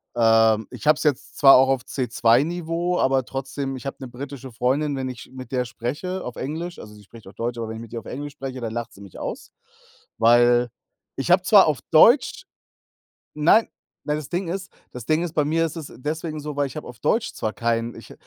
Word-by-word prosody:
Ähm, 115 -2 +4
ich - - -8
habe 155 0 +6
es - - -4
jetzt 145 -5 -1
zwar 135 -1 +8
auch 130 +1 +5
auf 135 -2 +1
C2-Niveau, 160 +8 0
aber 130 -1 +2
trotzdem. 135 +1 -4
Ich 130 - -11
habe 135 - -4
'ne 130 - -6
britische 130 +1 -8
Freundin, 135 +5 0
wenn 130 -1 -3
ich 125 -1 -8
sch - - -17
mit 130 -2 -10
der 125 -1 0
spreche 145 +11 -4
auf 125 - -6
Englisch 165 +5 -5
also, 105 - -11
sie 105 - -15
spricht 110 +1 -15
auch 95 - -12
Deutsch, 120 +1 -3
aber 115 -1 -4
wenn 110 - -6
ich - - -8
mit 115 0 -11
ihr 115 - -3
auf - - -16
Englisch 145 +2 -6
spreche, 135 -2 -7
dann 115 -2 -4
lacht 120 -1 -5
sie 100 - -15
mich 100 -2 -12
aus. - - -6 0.7
Weil 120 +1 +4 0.5
ich 135 - -3
habe 180 +1 +5
zwar 200 -1 +6
auf 150 -5 0
Deutsch 245 - +5 0.9
Nein, 165 +9 +4 0.4
weil 150 - 0
das 150 -3 -7
Ding 180 +1 -2
ist 185 +1 -5 0.2
das 125 -3 -8
Ding 155 +4 +1
ist, 170 -2 -4
bei 150 - +2
mir 165 +2 +1
ist 160 - -5
es 155 -3 -8
deswegen 155 +3 -4
so, 150 0 -6
weil 145 0 0
ich 130 - -12
habe 155 - -7
auf 120 -1 -11
Deutsch 225 - 0
zwar 110 - -3
kein 115 0 -1
ich - - -12
135 Hz, 230 wpm, -23 LUFS, 120-155 Hz, 0.9 s, zwar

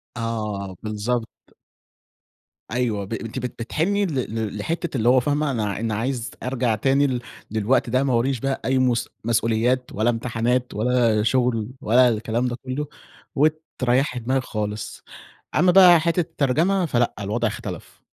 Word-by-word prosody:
آه، 105 -5 -3
بالضبط. 110 +2 -2 1.4
أيوه 115 -5 -1
ب 105 - -6
أنتِ 115 +3 -4
بت 125 0 -3
بتحني 195 - 0
ل 115 - -3
لحتة 165 - -3
اللي 115 +1 +3
هو 130 - +6
فاهمة 145 +3 0
أنا 110 -5 -1
ع 100 - -3
أنا 110 -1 -1
عايز 120 +1 -2
أرجع 125 -3 0
تاني 135 +6 +2
لل 125 -2 -2 0.3
للوقت 110 +3 +1
ده، 130 +3 +2
ما 135 - +1
وراييش 120 +1 +1
بقى 135 +2 -2
أي 130 0 +2
مُس 120 -2 +1
مَسؤوليات، 115 +2 +1
ولا 110 +3 +1
امتحانات، 120 +1 -1
ولا 115 -1 +2
شغل، 115 -2 +1
ولا 125 -1 +5
الكلام 115 +2 -1
ده 120 - -2
كله، 140 +3 -3 0.5
وتريحي 135 -4 +1
دماغك 130 +2 0
خالص. 105 -2 -5 0.5
أمّا 180 0 +5
بقى 180 -3 +8
حتة 170 +2 +1
الترجمة، 165 +3 +1
فلأ، 120 -6 +1
الوضع 110 +4 -1
اختلف. - - -7
125 Hz, 150 wpm, -23 LUFS, 115-135 Hz, 1.4 s, بقى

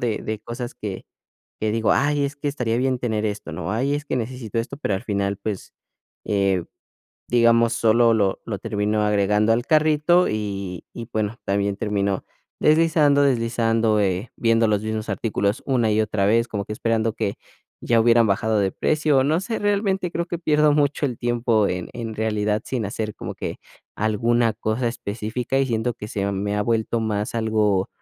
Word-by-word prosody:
de 115 -3 -1
de 110 0 -3
cosas 120 +3 -6
que 100 -3 -6 0.6
que 110 - 0
digo, 115 0 +2
ay 145 0 +2
es 140 +1 -3
que 145 0 -3
estaría 125 -5 -1
bien 130 +1 +1
tener 110 -3 -1
esto, 105 -6 -5
¿no? 80 +3 -4
Ay 130 +7 0
es 145 0 -3
que 145 - -2
necesito 120 -2 -4
esto, 115 +4 -3
pero 140 -8 -1
al 95 - -3
final, 100 -2 -1
pues, 100 -1 -5 0.5
eh, 100 -3 +1 0.6
digamos, 115 -1 +4
solo 115 0 +4
lo 100 -3 +1
lo 105 -4 -3
terminó 105 0 -1
agregando 105 +1 +2
al 120 +3 0
carrito 155 +3 +4
y 100 -4 -4
y 115 -1 -6
bueno, 110 +1 -1
también 100 0 0
termino 100 -2 -1 0.3
deslizando, 155 -2 +4
deslizando, 115 -4 +2
eh, 95 +2 -1
viendo 115 -1 +3
los 105 -1 +1
mismos 110 0 -3
artículos 105 0 -1
una 120 -5 +2
y 105 +1 +2
otra 105 -2 0
vez, 115 +3 +3
como 100 -3 -3
que 105 - -6
esperando 115 0 0
que 100 - -2 0.5
ya 115 - +2
hubieran 115 0 +5
bajado 110 +2 +1
de 100 -2 +1
precio. 150 -3 +2
No 155 +5 +2
sé, 225 +3 -3
realmente 200 -3 0
creo 170 0 -2
que 175 -1 -4
pierdo 150 -2 +3
mucho 145 0 +1
el 125 - -4
tiempo 120 -3 +1
en 90 -2 -3
en 115 -2 -5
realidad 105 -1 0
sin 125 -4 -2
hacer 105 +1 -4
como - - -6
que - - -5 0.4
alguna 115 +2 +1
cosa 110 +3 -2
específica, 115 +3 -3
y 135 - +3
siento 120 0 -1
que 105 - -8
se 100 -1 -2
me 100 +1 -2
ha 105 - +1
vuelto 115 +1 0
más 105 -1 -2
algo 110 -4 +1
115 Hz, 180 wpm, -23 LUFS, 105-125 Hz, 0.6 s, hubieran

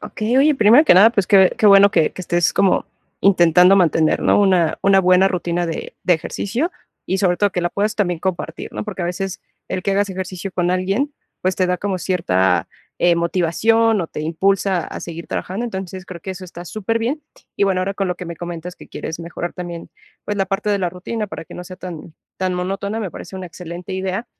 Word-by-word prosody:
Okey, 220 +4 -2
oye, 295 +2 +5
primero 240 +5 +6
que - - +6
nada, 205 +5 +8
pues, 200 -5 0
qué 190 -2 +5
qué 215 - +3
bueno 200 0 +7
que 165 -5 +2
que - - -8
estés 175 -1 +1
como 195 -2 +2 0.3
intentando 180 0 +5
mantener, 160 -4 +3
¿no?, - - +3
una 185 -5 +2
una 195 -1 +5
buena 185 +1 +4
rutina 175 -1 -1
de 165 - -5
de 180 - +4
ejercicio, 235 - -3 0.3
y 190 - -1
sobre 180 -3 +2
todo 205 +1 +2
que 180 - -1
la 175 - 0
puedas 205 +4 -1
también 180 -5 0
compartir, 185 -1 -4
¿no? - - -4
Porque 195 -4 -5
a - - -1
veces 180 +2 -4 0.3
el 185 -1 -3
que 200 - 0
hagas 200 +1 +1
ejercicio 190 0 -5
con 175 -1 0
alguien, 195 +10 0 0.3
pues, 185 0 0
te 185 - +2
da 180 - 0
como 195 0 -2
cierta, 95 - +1 0.3
eh, 175 -1 +3
motivación, 205 +6 +2
o 170 - -2
te 150 - -7
impulsa 185 +2 +1
a - - -7
seguir 170 -1 -7
trabajando. 200 +6 -4
Entonces, 190 -3 -6
creo 175 -2 -9
que 195 - -6
eso 185 0 -7
está 175 0 -10
superbién. 225 - -2 0.4
Y, 200 - +3
bueno, 190 -2 +1
ahora 195 +1 -2
con 195 - -1
lo 180 - -1
que 180 - -8
me 170 -1 -6
comentas 175 0 -7
que - - -13
quieres 160 - -6
mejorar 170 +1 -5
también, 175 -2 -7 0.3
pues, 205 - -3
la 195 - 0
parte 200 +2 -1
de 200 - +1
la 180 -2 0
rutina 210 +5 -4
para 190 - -8
que - - -12
no 180 - -7
sea 185 - -9
tan 170 -3 -9 0.2
tan 185 -1 -1
monótona, 195 +4 -3
me 195 - -4
parece 175 - -10
una 185 - -6
excelente 175 +2 -8
idea. 190 +4 -3
185 Hz, 220 wpm, -20 LUFS, 175-200 Hz, 0.4 s, nada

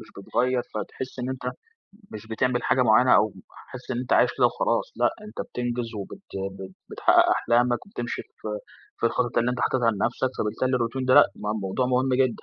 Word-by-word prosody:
مش 110 - -13
بتغيّر، 125 +5 0
فتحس 130 +4 -6
إن 125 - -3
أنت 130 - -6 0.7
مش 110 0 -8
بتعمل 125 +2 0
حاجة 130 - +2
معينة 125 +2 +5
أو 105 -1 +2 0.4
حاسس 130 0 -9
إن 120 - -1
أنت 125 0 -3
عايش - - +5
كده - - +6
وخلاص. - - -1
لأ، - - +3 0.2
أنت 215 - -7
بتنجز 120 -1 -3
وبت 105 - -7 0.4
بت 95 -1 -8 0.2
بتحقق - - +4
أحلامك 120 +5 +2
وبتمشي 120 -11 -5
في - - -11 0.5
في 115 - +2
الخطط 120 0 0
اللي 120 +1 +2
أنت 125 0 -3
حاططها 120 -2 +2
لنفسك. 120 +5 -1
فبالتالي 130 +4 0
الروتين 125 +2 -2
ده 130 0 +4
لأ، - - +9
م 105 +1 -3
موضوع 100 +7 -1
مهم 130 +1 +1
جدًا. 130 -2 +1
125 Hz, 190 wpm, -25 LUFS, 115-130 Hz, 0.7 s, لأ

